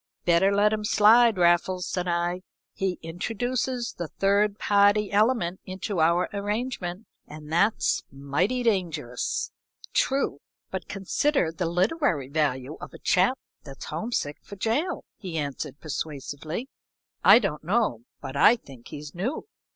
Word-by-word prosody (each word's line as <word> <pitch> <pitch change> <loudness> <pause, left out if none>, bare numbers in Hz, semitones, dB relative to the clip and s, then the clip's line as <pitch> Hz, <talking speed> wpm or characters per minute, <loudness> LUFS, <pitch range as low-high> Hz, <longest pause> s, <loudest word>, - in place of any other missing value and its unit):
"Better 175 +3 +4
let 205 +1 +3
him 215 -1 -2
slide, 220 +2 +5
Raffles," 175 +1 +2
said 180 -1 -2
I. 175 +1 0 0.3
"He 190 -2 -2
introduces 235 +8 -2
the 170 - -2
third 200 +4 +1
party 205 0 +3
element 205 -4 +2
into 190 0 -4
our 170 +3 +3
arrangement, 205 -2 -3 0.2
and 150 +1 -9
that's 200 +6 +2
mighty 145 - -1
dangerous." 165 - -1 0.4
"True 270 - +1 0.3
but 190 -3 -5
consider 195 - 0
the 165 +1 -2
literary 180 - 0
value 140 -1 -1
of - - -9
a - - -8
chap 190 +9 +2 0.3
that's 135 -2 -9
homesick 155 -3 -3
for 200 - -11
jail," 275 - -1
he 180 -4 -6
answered, 145 -1 -4
persuasively. 155 - -5 0.6
"I - - +9
don't 195 -11 -2
know, 190 - +1 0.2
but 130 - -7
I 220 - +6
think 135 - -14
he's 150 0 -8
new." 205 - -3
185 Hz, 135 wpm, -26 LUFS, 160-215 Hz, 0.6 s, I